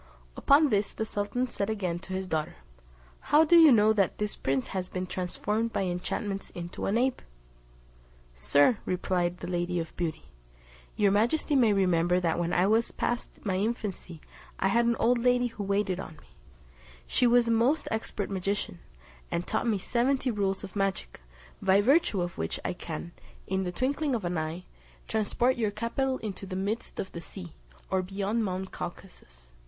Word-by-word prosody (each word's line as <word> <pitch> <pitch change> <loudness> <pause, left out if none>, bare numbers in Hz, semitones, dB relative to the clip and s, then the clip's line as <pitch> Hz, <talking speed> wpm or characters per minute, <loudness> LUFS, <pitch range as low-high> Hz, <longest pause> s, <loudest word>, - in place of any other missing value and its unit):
Upon 290 +1 +5
this 205 -3 +1
the 220 - -3
sultan 215 +4 -1
said 210 -4 -3
again 185 -6 -2
to 190 +1 -8
his 190 0 -3
daughter, 155 -3 -2 0.7
"How 300 +2 +7
do 345 - +5
you 325 -3 +9
know 215 -2 +5
that 200 -3 +1
this 210 0 -2
prince 135 -1 -1
has 185 -1 -3
been 185 0 -3
transformed 210 +5 -2
by 200 - -1
enchantments 195 +2 -3
into 175 0 -5
an 205 - +2
ape?" 255 +1 +1 1.1
"Sir," 145 - +3
replied 180 -1 -1
the 175 - -5
Lady 175 0 -1
of 165 -1 -6
Beauty, 160 -3 -3 0.7
"your 205 -2 +3
majesty 240 +9 +2
may 240 -5 +5
remember 180 -2 +3
that 170 -2 0
when 170 0 -1
I 180 - +3
was 220 +3 +3
past 240 0 -2 0.2
my 190 -2 0
infancy 200 -6 -3 0.4
I 195 - +1
had 235 +3 +3
an 235 - +3
old 240 +1 +3
lady 245 +1 +3
who 225 -4 -4
waited 200 -2 0
on 160 - -7
me; 150 - -20 0.8
she 245 - +2
was 240 0 +4
a - - +2
most 250 +7 +2
expert 220 -2 -3
magician, 195 - -2 0.5
and 170 - -2
taught - - -1
me 220 -3 +2
seventy 250 +6 0
rules 195 -2 -1
of 195 0 -9
magic, 195 - -2 0.4
by 190 +1 +4
virtue 235 - +3
of 175 0 -6
which 80 - -2
I - - 0
can, 170 -1 -6 0.3
in 190 0 -1
the 180 - -2
twinkling 275 - 0
of 215 -6 -3
an 175 -1 -1
eye, 160 +3 -4 0.4
transport 230 +4 +1
your 220 -3 +1
capital 235 +5 -1
into 200 -4 -6
the 185 - -5
midst 200 +4 -3
of 190 - -4
the 170 - -7
sea, 175 -1 -9 0.4
or 190 -1 +2
beyond 200 +4 -1
mount 190 -1 -3
Caucasus. - - -9
200 Hz, 180 wpm, -28 LUFS, 180-230 Hz, 1.1 s, you